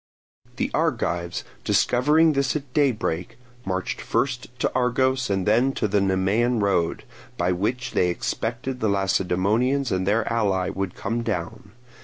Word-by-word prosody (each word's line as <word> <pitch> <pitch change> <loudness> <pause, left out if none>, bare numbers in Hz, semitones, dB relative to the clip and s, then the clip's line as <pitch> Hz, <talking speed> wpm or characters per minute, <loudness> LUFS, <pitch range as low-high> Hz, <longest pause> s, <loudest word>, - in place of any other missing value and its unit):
The - - -2
Argives 85 0 -1 0.2
discovering 150 +6 +3
this 140 0 0
at 140 -4 -5
daybreak, 115 - 0 0.3
marched 95 -1 -3
first 130 -2 -1
to - - 0
Argos 130 0 +1
and 95 -2 0
then 120 +6 +3
to 110 - -1
the 100 0 +1
Nemean 100 +6 +1
road, 90 -5 0 0.3
by 85 +1 +1
which 120 +8 -1
they 90 - +2
expected 120 +8 -3
the 110 - +1
Lacedaemonians 100 +7 +1
and 95 0 0
their 110 +2 +2
allies 100 -5 0
would 95 -1 -3
come 115 +1 -2
down. 105 -1 -4
110 Hz, 140 wpm, -24 LUFS, 95-125 Hz, 0.3 s, discovering